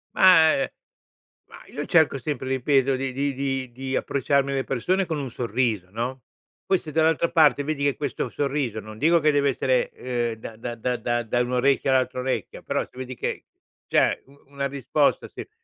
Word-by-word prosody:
Ma 160 -4 +7
ehm, 135 - 0 0.8
ma - - -12
io 145 - -5
cerco 160 -4 +3
sempre, 135 -2 -4
ripeto, 135 +1 +2
di 135 0 -2
di 140 +2 -1
di 135 -2 -3
di 130 +2 -4
approcciarmi 140 0 +1
alle 135 -1 0
persone 180 +11 0
con 160 -3 -3
un 135 -2 -4
sorriso, 115 -5 -1
no, 120 +4 -4 0.4
poi, 190 - +2
se 155 - -9
dall'altra 160 +2 +2
parte 155 -4 +4
vedi 145 -1 -2
che 140 -1 +2
questo 145 -3 -3
sorriso 140 -6 -2
non 110 +1 -10
dico 165 +6 +4
che 150 -1 +3
deve 140 -1 +2
essere, - - +1
ehm, 120 - -2
da 110 0 -9
da 120 +1 -6
da 125 +2 -2
da 120 +1 -1
da 120 +2 -1
un 125 0 -2
orecchio 135 +2 +2
all'altro 130 -1 +1
orecchio 130 0 -3
però, - - -1
se - - -16
vedi 130 0 -6
che, - - -4 0.4
cioè, - - +2
u 140 +1 -21
una 140 0 -3
risposta 140 +2 0
se - - -9
135 Hz, 190 wpm, -24 LUFS, 125-145 Hz, 0.8 s, Ma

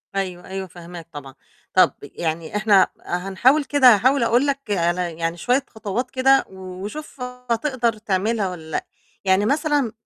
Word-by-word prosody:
أيوه، 185 -2 -3
أيوه 190 0 -5
فهماك 170 -1 -11
طبعًا. 140 -3 -9 0.4
طَب - - +5
يعني 165 +2 -4
إحنا 210 -2 +5 0.2
هنحاول 195 - +2
كده 260 -5 +6
هاحاول 255 +4 +2
أقول 245 +5 +3
لَك 280 0 0
على 175 -2 0
يعني 165 +1 -2
شوية 250 +9 +1
خطوات 220 +3 -4
كده 270 +1 +4
و 185 0 -9
وشوف 285 +4 -8
هتقدر 250 -1 -1
تعملها 210 0 0
والّا 160 -3 -9
لأ، - - -2 0.4
يعني 190 +2 +3
مثلًا 290 -3 +1
205 Hz, 150 wpm, -22 LUFS, 180-250 Hz, 0.4 s, كده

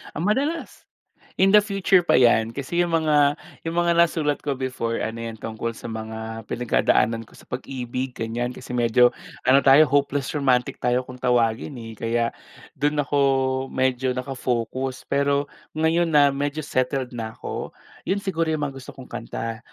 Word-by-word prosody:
Ah, 160 - -2
madalas. 280 - -1 0.5
In 195 +1 +4
the 210 - +8
future 195 -2 +3
pa 175 - +2
'yan, 115 -2 +4
kasi 140 +5 -3
'yong 170 -1 +2
mga 145 -1 +4 0.3
'yong 165 - -3
mga 170 0 +2
nasulat 155 -4 +2
ko 140 -2 -2
before 125 -3 -2
ano 115 +1 -4
'yan, 115 -1 -5
tungkol 115 +1 -5
sa 115 - -7
mga 110 0 -6
pinagdadaanan 115 -1 +1
ko - - -19
sa - - -16
pag-ibig, 125 0 -4
ganyan. 120 +2 -3
Kasi 125 - -9
medyo, 120 0 +4 0.3
ano 130 +2 +6
tayo 140 +3 +7
hopeless 140 -1 +1
romantic 130 -4 +1
tayo 125 +1 +1
kung 125 0 -11
tawagin, 120 +2 +1
eh. 115 -2 -8
Kaya 115 0 0 0.5
do'n 145 0 +1
ako 145 +1 -1 0.5
medyo 130 -1 0
naka-focus. 130 -1 -3
Pero 140 +1 +1 0.2
ngayon 160 +2 +2
na 145 -3 +5
medyo 145 +2 -2
settled 130 -1 -1
na 115 -2 -6
ako, - - -6 0.3
'yon 195 +2 0
siguro 165 -4 -1
'yong 155 -2 -1
mga - - -14
gusto 130 - -11
kong 130 - -12
kanta. 115 0 -5
130 Hz, 165 wpm, -23 LUFS, 120-150 Hz, 0.5 s, the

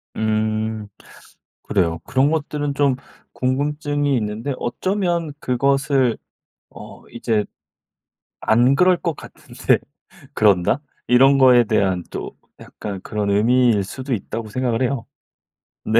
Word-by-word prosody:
음. 110 0 -1 0.8
그래요. 85 -5 0
그런 135 +3 +2
것들은 145 -2 -2
좀 140 -2 +2 0.4
궁금증이 145 +1 0
있는데 110 +5 -3
어쩌면 175 +3 -1
그것을 135 -1 +1 0.5
어 - - -13
이제 110 -2 -1 1.0
안 120 +4 +3
그럴 180 +1 +4
것 170 -4 -2
같은데 - - -1 0.6
그런다? 100 +5 +3 0.3
이런 135 +3 +5
거에 125 -2 +6
대한 95 -4 +1
또 - - -6 0.2
약간 100 -2 -7
그런 105 -2 -2
의미일 115 0 +3
수도 130 +7 -6
있다고 110 +2 -5
생각을 125 +1 -1
해요. 125 -2 -1 0.8
네. 115 +2 +4
125 Hz, 230 characters per minute, -21 LUFS, 110-140 Hz, 1.0 s, 거에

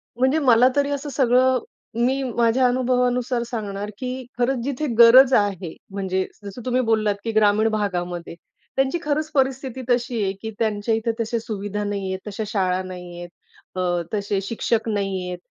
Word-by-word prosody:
म्हणजे 260 +6 +2
मला 250 -3 +5
तरी 285 0 +2
असं 285 +1 -3
सगळं 255 -1 +3 0.5
मी 265 +2 +1
माझ्या 240 0 +2
अनुभवानुसार 250 -1 +1
सांगणार, 210 -3 -4
की 255 +1 -5
खरंच 245 0 0
जिथे 280 +3 -2
गरज 250 +3 +8
आहे, 195 -6 +1 0.2
म्हणजे 190 -1 -1 0.2
जसं 200 +5 -7
तुम्ही 255 0 +1
बोललात, 220 -3 +1
की 230 - -2
ग्रामीण 215 0 +3
भागामध्ये. 175 -5 -3 0.4
त्यांची 270 +5 +1
खरंच 305 +1 -1
परिस्थिती 265 -1 0
तशी 245 -1 +1
आहे 190 - 0
की 220 - -5
त्यांच्या 220 0 0
इथे 225 +1 -1
तशा 230 +1 -1
सुविधा 210 -2 -4
नाही 200 -2 -3
आहेत, 190 - -4
तश्या 210 +1 -4
शाळा 185 -3 0
नाही 180 -1 -9
आहेत. 175 0 -8 0.5
अ, 175 -1 0
तसे 200 -1 -1
शिक्षक 225 +2 -1
नाही 195 -3 -2
आहेत. 180 0 -4
225 Hz, 165 wpm, -22 LUFS, 200-255 Hz, 0.5 s, गरज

